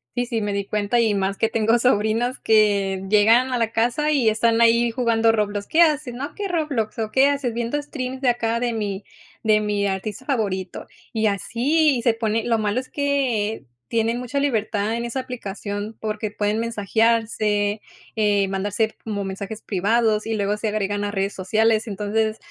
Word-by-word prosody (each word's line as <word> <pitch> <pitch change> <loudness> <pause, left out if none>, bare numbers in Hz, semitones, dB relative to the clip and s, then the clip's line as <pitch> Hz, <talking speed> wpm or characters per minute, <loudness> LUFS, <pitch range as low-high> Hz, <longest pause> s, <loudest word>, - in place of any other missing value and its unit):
Sí, 245 - 0
sí, 235 -2 -2
me 205 -1 -2
di 200 0 -2
cuenta, 210 +3 0
y 225 -3 +3
más 195 0 -1
que 225 - +2
tengo 225 +1 +2
sobrinos 235 +1 +1
que 200 -3 +2
llegan 225 +5 +4
a 245 - 0
la 230 -1 0
casa 245 +7 +1
y 260 -7 +3
están 225 +1 +2
ahí 235 +1 +4
jugando 230 -2 +2
Roblox. 205 -2 -1
¿Qué 330 - +3
hacen? 300 -6 0
No 260 - -5
aquí 340 +8 -6
en 395 - -2
Roblox, 285 -10 -1
¿o 220 -1 -3
qué 265 +3 +5
haces? 280 -5 -1
Viendo 235 +5 -2
streams 265 -3 -5
de 260 - +3
acá 235 -1 0
de 240 -1 -1
mi 205 -3 -3 0.4
de 215 -1 +3
mi 205 -1 0
artista 200 +5 -4
favorito, 195 -9 -2 0.3
y 220 -1 +1
así 250 - +1
se 235 - +3
pone. 225 -1 -1
Lo 230 -1 +2
malo 215 +2 0
es 255 - -8
que 260 - -1 0.3
tienen 230 +1 0
mucha 250 +3 -3
libertad 220 -5 0
en 235 0 -3
esa 240 +3 -3
aplicación, 205 -3 -6
porque 215 -1 -3
pueden 210 +1 -1
mensajearse, 220 -1 +1 0.4
eh, 205 -2 +2
mandarse 205 +3 -1
como 205 -2 -3
mensajes 200 +3 -6
privados 215 +2 +1
y 225 - -2
luego 205 -1 0
se 220 - -3
agregan 205 -1 -1
a 205 - -2
redes 195 0 -1
sociales. 220 +4 +1
Entonces, 215 +2 -1
220 Hz, 185 wpm, -22 LUFS, 205-240 Hz, 0.4 s, qué